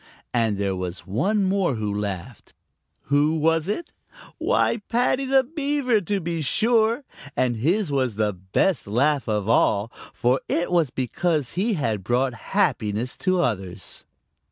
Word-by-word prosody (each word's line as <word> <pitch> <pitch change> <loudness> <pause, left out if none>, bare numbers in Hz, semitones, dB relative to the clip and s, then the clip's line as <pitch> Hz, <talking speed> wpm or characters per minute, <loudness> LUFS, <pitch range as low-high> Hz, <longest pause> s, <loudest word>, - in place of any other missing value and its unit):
And 115 -4 +1
there 100 -1 -1
was 90 -1 -5
one 195 - +1
more 190 -7 +1
who 105 -2 -2
laughed. 100 -4 -5 0.6
Who 150 +3 +3
was 165 +2 +1
it? 300 +10 -3 0.5
Why, - - +2
Paddy 250 +3 +1
the 265 0 +4
Beaver 280 -5 0
to 200 +2 -1
be 170 -2 -3
sure, 225 - +2 0.3
and 120 -2 +1
his 170 - +1
was 130 -5 0
the 105 -1 0
best 95 - 0
laugh 135 +5 +1
of 105 -2 0
all, 110 -1 +2 0.2
for 125 +1 +1
it 170 +1 0
was 170 -5 +3
because 140 +3 -1
he 205 +5 0
had 110 - -1
brought 125 +4 +1
happiness 110 0 -1
to 185 -2 +1
others. 95 - -3
140 Hz, 145 wpm, -24 LUFS, -, 0.6 s, the